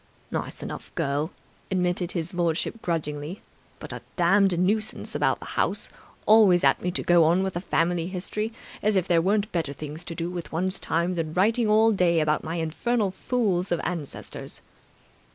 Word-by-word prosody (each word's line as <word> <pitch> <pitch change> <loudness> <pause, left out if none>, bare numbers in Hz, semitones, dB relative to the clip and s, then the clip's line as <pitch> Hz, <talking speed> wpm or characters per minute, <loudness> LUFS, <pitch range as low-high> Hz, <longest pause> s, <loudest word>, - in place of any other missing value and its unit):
"Nice - - -4
enough - - -7
girl," 145 +3 0 0.4
admitted 180 -2 0
his 170 0 -3
lordship 175 +6 -1
grudgingly. 155 0 -3 0.3
"But - - -8
a - - -6
damned 190 +1 +4
nuisance 210 +4 0
about - - +1
the - - -9
house; - - -1 0.4
always 205 -5 +6
at - - +4
me 180 - -1
to 180 - -1
go 175 -1 +5
on 175 +4 +3
with 190 -1 -2
the 175 - -3
family 170 -2 0
history. 200 +4 -3 0.3
As 210 0 +2
if 190 -1 +2
there 170 -2 +4
weren't 205 +3 +1
better 160 -5 -1
things 150 +3 -7
to 165 - -6
do 170 +1 -3
with 175 -2 -6
one's 185 +3 -1
time 170 +2 0
than 160 -3 -3
writing 220 +5 +3
all 220 +1 +5
day 180 -5 +3
about 155 -1 +1
my 160 +1 -3
infernal 195 +6 0
fools 195 -5 0
of 175 - +2
ancestors!" 165 -5 -6
175 Hz, 175 wpm, -26 LUFS, 165-195 Hz, 0.4 s, always